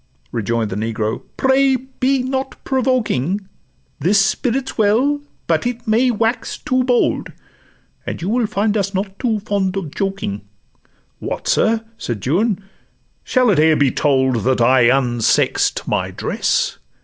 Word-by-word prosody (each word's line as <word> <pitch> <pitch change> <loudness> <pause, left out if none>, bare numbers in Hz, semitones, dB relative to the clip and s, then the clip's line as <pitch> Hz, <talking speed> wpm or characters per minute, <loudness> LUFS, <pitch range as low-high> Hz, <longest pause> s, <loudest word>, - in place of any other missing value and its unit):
Rejoin'd 115 -1 -1
the - - -3
negro, 110 +1 -2 0.2
'pray 265 0 +3
be 260 +1 -1
not 265 +1 -3
provoking; 230 - 0 0.6
This 185 +8 +3
spirit 240 +7 +1
's - - -8
well, 245 +7 +2 0.2
but 165 +7 +1
it 240 -1 -5
may 230 +4 +3
wax 225 0 -1
too 255 0 0
bold, 245 -1 +1 0.7
And - - -5
you 175 - -4
will 230 +1 +1
find 205 +1 0
us 200 -1 -1
not 195 0 -3
top 220 -5 -1
fond 195 -3 -1
of 165 -7 -5
joking.' 195 - -3 0.8
'What, - - -5
sir!' 225 0 +2 0.2
said 115 -5 -4
Juan, 195 - +1 0.6
'shall 255 -4 +3
it 180 - +2
e'er 155 0 +5
be 140 -3 +3
told 130 -3 +2
That 130 0 +1
I 120 +1 +5
unsex'd 120 -3 +2
my - - 0
dress? - - -1
205 Hz, 145 wpm, -19 LUFS, -, 0.8 s, e'er